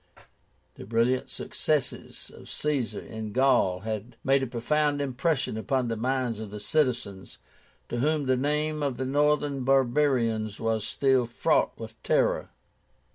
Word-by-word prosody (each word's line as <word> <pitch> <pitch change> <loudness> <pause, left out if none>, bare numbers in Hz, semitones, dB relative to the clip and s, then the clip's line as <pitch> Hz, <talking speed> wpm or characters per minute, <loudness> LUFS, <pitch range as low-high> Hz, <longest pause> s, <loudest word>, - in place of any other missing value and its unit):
The - - -9
brilliant 115 +3 +1
successes 150 -4 -3
of - - -13
Caesar 145 -6 -1
in 110 -2 -7
Gaul 120 -9 +3
had 110 +2 -5
made 135 +1 +3
a 130 - -1
profound 145 +5 0
impression 140 -2 -1
upon 125 +2 0
the 115 - -1
minds 125 -1 -1
of 110 -2 -6
the 105 +1 -7
citizens, 120 -7 -1 0.5
to - - -4
whom 150 +2 +1
the 130 0 +3
name 150 +3 0
of 140 -4 -1
the 130 - -2
northern 145 0 +1
barbarians 125 -5 +2
was 110 -2 -1
still 130 -3 +2
fraught 120 - +1
with - - -10
terror. - - +1
130 Hz, 140 wpm, -27 LUFS, 115-145 Hz, 0.5 s, Gaul